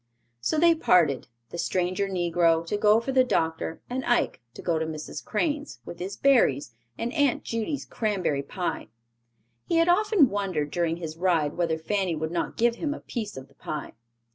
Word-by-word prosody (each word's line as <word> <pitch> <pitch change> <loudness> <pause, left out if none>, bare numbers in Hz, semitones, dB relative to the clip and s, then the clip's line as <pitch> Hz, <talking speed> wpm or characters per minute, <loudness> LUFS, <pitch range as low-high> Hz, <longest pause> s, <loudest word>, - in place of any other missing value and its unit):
So 120 - 0
they 335 +2 +6
parted, 170 - +3 0.2
the 170 - -6
stranger 185 +3 0
negro 170 -2 +2
to 170 - -2
go 210 +1 +5
for 235 +4 -3
the 260 -1 +5
doctor 160 -8 -1
and 260 +1 -3
Ike 240 - +1
to - - -9
go 165 -2 +1
to 160 - -1
Mrs. 155 -1 -6
Crane's, 295 +5 -2
with 170 - -8
his 190 +3 -5
berries, 145 - +3 0.2
and 240 +2 -3
Aunt 285 -5 +2
Judy's 230 +5 -3
cranberry 190 -10 -1
pie. 175 +5 -4 0.8
He - - 0
had 330 +1 +4
often 390 - +4
wondered 185 -8 -1
during 170 -1 0
his 160 -2 -6
ride 165 -5 +1
whether 165 -2 0
Fanny 185 +1 -1
would 160 +1 -3
not 175 - -2
give 235 0 +2
him 295 -3 -2
a - - -8
piece 215 - -5
of 130 0 -8
the - - -25
pie. 150 -1 -6
185 Hz, 185 wpm, -26 LUFS, 160-245 Hz, 0.8 s, they